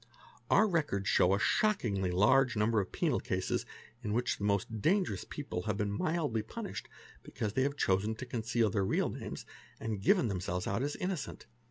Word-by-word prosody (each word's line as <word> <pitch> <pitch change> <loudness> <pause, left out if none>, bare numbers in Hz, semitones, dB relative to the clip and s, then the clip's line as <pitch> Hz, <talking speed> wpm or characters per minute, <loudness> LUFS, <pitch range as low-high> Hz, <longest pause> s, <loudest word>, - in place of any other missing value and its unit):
Our 220 - +5
records 145 - 0
show 90 +2 +4
a - - -1
shockingly 115 - +1
large 115 +8 +4
number 110 +1 +2
of 95 - -6
penal - - +1
cases - - -2 0.3
in 105 - -2
which 120 +2 0
the - - -5
most 100 +1 0
dangerous 190 - +1
— - - -34
people 140 -12 -4
have 105 -2 0
been 105 -1 -1
mildly 145 0 0
punished 105 - -6 0.3
because 105 -2 -4
they 130 - +1
have 140 +2 0
chosen 100 +2 +1
to 130 - -6
conceal 115 -2 0
their 100 -3 +1
real 95 - +1
names, - - -6 0.3
and 110 -3 -3
give 200 - +5
themselves 90 - -1
out 100 +5 -1
as 145 +2 -1
innocent. 185 -4 -4
110 Hz, 185 wpm, -32 LUFS, 100-140 Hz, 0.3 s, Our